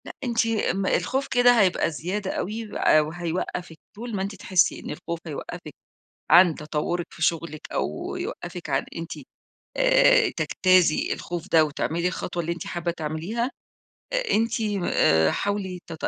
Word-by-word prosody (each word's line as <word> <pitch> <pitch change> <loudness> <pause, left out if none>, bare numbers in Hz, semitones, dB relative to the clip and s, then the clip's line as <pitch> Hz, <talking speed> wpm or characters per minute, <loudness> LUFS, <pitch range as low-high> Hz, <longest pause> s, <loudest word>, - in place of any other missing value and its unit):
لأ - - -9
أنتِ 235 -2 +1 0.3
م 195 +1 -2
الخوف 265 +7 0
كده 245 -1 +5
هيبقى 185 -3 +2
زيادة 185 +6 -3
أوي 220 +4 -3
و - - -9 0.3
وهيوقفِك، 170 0 -4 0.2
طول 230 +1 -6
ما 190 - -2
أنتِ 200 +1 -3
تحسي 185 -2 +2
إن - - -8
الخوف 170 +2 -5
هيوقفِك 150 - -7 0.6
عن 175 0 +7
تطورِك 150 +4 -3
في - - -9
شغلِك 165 -2 -1
أو 75 +1 -3
يوقفِك 175 -2 -6
عن 135 0 +1
أنتِ، 165 0 -5 0.6
آآ، - - +5
تجتازي 185 -4 +3
الخوف 175 +1 -6
ده، 160 -1 +6
وتعملي 165 +3 -1
الخطوة 175 -1 -4
اللي 170 +1 -2
أنتِ 170 - -7
حابة 175 -1 -2
تعمليها، 170 - -3 0.8
أنتِ 225 +2 +1
م 205 -4 -1
آآ، 80 0 +3
حاولي 200 -3 -2
ت 170 - -7
175 Hz, 150 wpm, -25 LUFS, 165-205 Hz, 0.8 s, عن